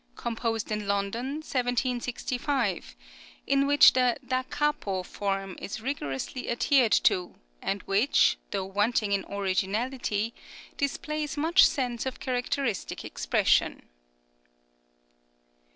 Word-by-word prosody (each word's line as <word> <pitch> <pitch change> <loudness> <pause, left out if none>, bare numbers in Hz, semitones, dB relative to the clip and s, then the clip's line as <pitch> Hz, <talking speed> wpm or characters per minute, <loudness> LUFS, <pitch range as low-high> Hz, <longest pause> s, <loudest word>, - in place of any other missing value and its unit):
composed 225 -2 -3
in 210 -1 -2
London, 200 +4 -1 0.2
1765, 250 +1 -1 0.5
in 275 0 +2
which 285 0 +7
the 250 -2 +2
Da 255 0 +1
capo 295 -11 -1
form 195 0 -3
is 200 - -5
rigorously 230 - -4
adhered 240 -1 +3
to, 180 -1 +2 0.3
and 200 0 -2
which, 210 +8 +3
though 195 -2 -2
wanting 205 +2 0
in 200 -1 +1
originality 205 +3 -1 0.4
displays 300 +2 -2
much 335 +6 +5
sense 250 -8 +1
of 260 - -5
characteristic 250 -3 -2
expression. - - +1
235 Hz, 100 wpm, -28 LUFS, 200-265 Hz, 0.5 s, which